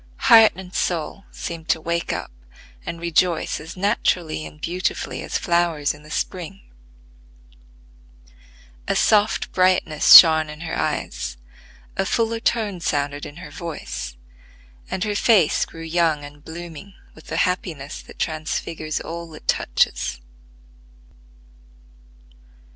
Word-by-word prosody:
Heart 225 -1 +9
and 185 0 -10
soul 175 +3 -2
seemed 165 -1 -7
to - - +3
wake 170 +1 -2
up - - -4 0.6
and 170 - -4
rejoice 170 0 +1
as 160 +4 -10
naturally 180 -5 0
and 150 - -15
beautifully 180 +4 -3
as - - -2
flowers 170 -5 +1
in 145 - -15
the 150 - -15
spring. 185 +4 -4 2.3
A - - +1
soft 210 0 +2
brightness 185 -4 +5
shone 160 -2 +9
in 150 +1 -9
her 165 -1 -4
eyes, 60 0 -3 0.6
a 195 - +1
fuller 230 +1 0
tone 220 -5 0
sounded 145 -3 -2
in 145 - -12
her 180 +2 -10
voice, 155 - -6 0.7
and 190 - -2
her 210 -1 -1
face 205 -6 +3
grew 165 - -10
young 165 -2 +1
and 145 0 -13
blooming 170 +4 -9 0.2
with 160 - -16
the - - -3
happiness 160 -6 -2
that - - -15
transfigures 155 0 -3
all 170 -1 -7
it - - -14
touches. 60 0 0
170 Hz, 125 wpm, -22 LUFS, 155-185 Hz, 2.3 s, Heart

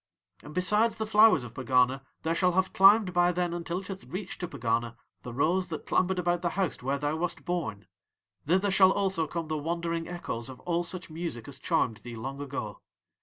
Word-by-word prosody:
"'And 150 - -11
besides 210 +5 +2
the 220 - -2
flowers 215 - +5
of 120 - -9
Pegana 130 +1 +2 0.2
there 160 - +1
shall 180 +1 +2
have 190 +1 +1
climbed 195 -1 +6
by 175 0 +4
then 175 -1 -1
until 175 +1 -3
it 190 - -12
hath 195 -1 -7
reached 185 +1 -6
to 180 - -3
Pegana 120 -4 -1 0.3
the 125 - -7
rose 170 +9 +1
that 160 -3 -6
clambered 185 0 +1
about 175 -1 0
the 175 - 0
house 190 -5 -1
where 135 +3 -1
thou 145 +2 -1
wast 175 +1 -3
born. 165 - -3 0.6
Thither 190 +4 +2
shall 190 0 +6
also 190 -5 0
come 165 0 -4
the 155 -1 -2
wandering 165 +1 -2
echoes 135 -9 -5
of 130 - -10
all 175 -1 0
such 175 -1 -5
music 155 -9 -5
as 140 - -8
charmed 115 -3 0
thee 120 +1 -9
long 135 +5 -6
ago. 130 -7 -5
170 Hz, 205 wpm, -28 LUFS, 135-185 Hz, 0.6 s, climbed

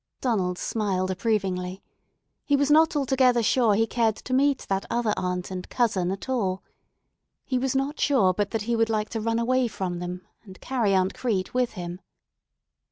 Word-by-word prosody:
Donald 190 -8 0
smiled 190 -4 -1
approvingly. 185 -2 -2 0.6
He 285 - +2
was 285 +1 +2
not 320 +2 +5
altogether 260 -4 +3
sure 225 -2 +3
he 225 +2 +3
cared 225 -1 +1
to 255 - -6
meet 275 +1 +3
that 195 0 0
other 235 -3 +1
aunt 180 0 -3
and 185 -1 -6
cousin 205 -7 +1
at 195 +5 -5
all. 195 -8 -1 0.8
He 255 -2 0
was 265 +1 -1
not 275 +3 -1
sure 225 -11 +3
but 205 +1 -1
he 235 +2 0
would 225 0 +2
like 215 -1 -1
to 225 - -3
run 230 +1 0
away 250 +2 +2
from 180 -5 -4
them, 180 +1 -6 0.2
and 190 -4 -13
carry 230 -7 0
Aunt 185 0 +2
Crete 205 -7 -2
with 250 -1 0
him. 175 -1 -6
220 Hz, 175 wpm, -25 LUFS, 185-255 Hz, 0.8 s, not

